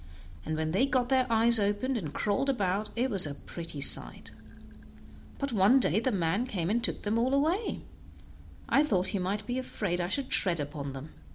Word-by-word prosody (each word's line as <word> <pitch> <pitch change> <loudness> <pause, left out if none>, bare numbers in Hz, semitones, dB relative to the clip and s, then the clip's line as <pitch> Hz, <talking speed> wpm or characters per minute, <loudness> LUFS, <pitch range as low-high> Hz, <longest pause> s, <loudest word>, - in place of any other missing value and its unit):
and 155 0 -3
when 155 0 -2
they 205 +11 +2
got 255 -3 0
their 260 -2 +2
eyes 230 +1 +4
open 205 +6 -1
and 170 -11 -4
crawled 215 - -1
about, 205 -4 -1
it 245 +3 0
was 190 -6 +7
a 145 - -4
real - - -15
pretty 165 -4 -7
sight; 140 - +1 1.1
but 280 -3 -4
one 210 +6 +4
day 210 -5 +1
the 255 +3 -1
man 195 +5 -1
came 185 -6 -2
and 235 +2 0
took - - -1
them 215 +2 0
all 255 +3 +1
away; 330 +10 -1 0.8
I 285 - +3
thought 190 -9 0
he 200 - -2
might 200 +3 -3
be 245 +3 -3
afraid 190 -8 -3
I 175 - -2
should 265 +7 -2
tread 175 -4 +2
upon 145 -1 -5
them. 135 +3 -9
205 Hz, 200 wpm, -29 LUFS, 175-255 Hz, 1.1 s, was